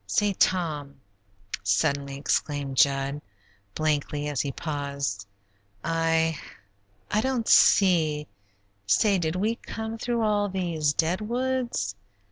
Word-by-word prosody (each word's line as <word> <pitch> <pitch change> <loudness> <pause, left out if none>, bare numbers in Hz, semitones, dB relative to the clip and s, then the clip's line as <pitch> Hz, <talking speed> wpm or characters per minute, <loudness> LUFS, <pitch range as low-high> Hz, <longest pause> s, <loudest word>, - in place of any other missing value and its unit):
Say, 205 - +1
Tom," 155 -7 0 0.7
suddenly 140 +7 0
exclaimed 140 -1 -1
Jud, 140 +1 +2 0.5
blankly, 150 -1 -1
as 145 -3 0
he 140 - -3
paused, 140 -9 -4 0.6
"I 165 -1 +1 0.7
I 210 - +2
don't 255 -3 -1
see 160 -6 +5 0.6
Say, 195 - +3
did 160 0 -1
we 215 +5 0
come 220 0 -6
through 235 -1 -1
all 205 -1 +1
these 170 -6 0
dead 165 +6 0
woods?" 245 - -1
160 Hz, 105 wpm, -26 LUFS, 140-205 Hz, 0.7 s, see